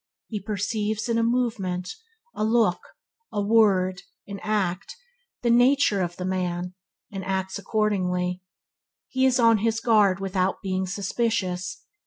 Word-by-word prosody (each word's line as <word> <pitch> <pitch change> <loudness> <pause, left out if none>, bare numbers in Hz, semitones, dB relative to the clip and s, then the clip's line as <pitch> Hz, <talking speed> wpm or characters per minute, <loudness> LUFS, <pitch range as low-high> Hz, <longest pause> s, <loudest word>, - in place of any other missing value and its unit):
He 215 - -5
perceives 210 +1 -2
in 230 -1 +1
a - - +2
movement, 220 -7 -1 0.4
a - - -2
look, 220 -5 +3 0.5
a 205 - -2
word, 200 -4 +3 0.2
an 200 0 -7
act, 195 - -2 0.5
the 235 - +3
nature 245 -3 +4
of 175 -1 -2
the 180 - -4
man, 180 -1 -2 0.4
and 195 -1 -5
acts 190 +1 -2
accordingly. 185 -4 0 0.7
He 260 0 +2
is 255 -1 +2
on 230 -2 +5
his 225 +1 0
guard 210 -5 +3
without 190 -1 -1
being 190 -1 -1
suspicious. 195 -1 -2
200 Hz, 135 wpm, -25 LUFS, 185-225 Hz, 0.7 s, on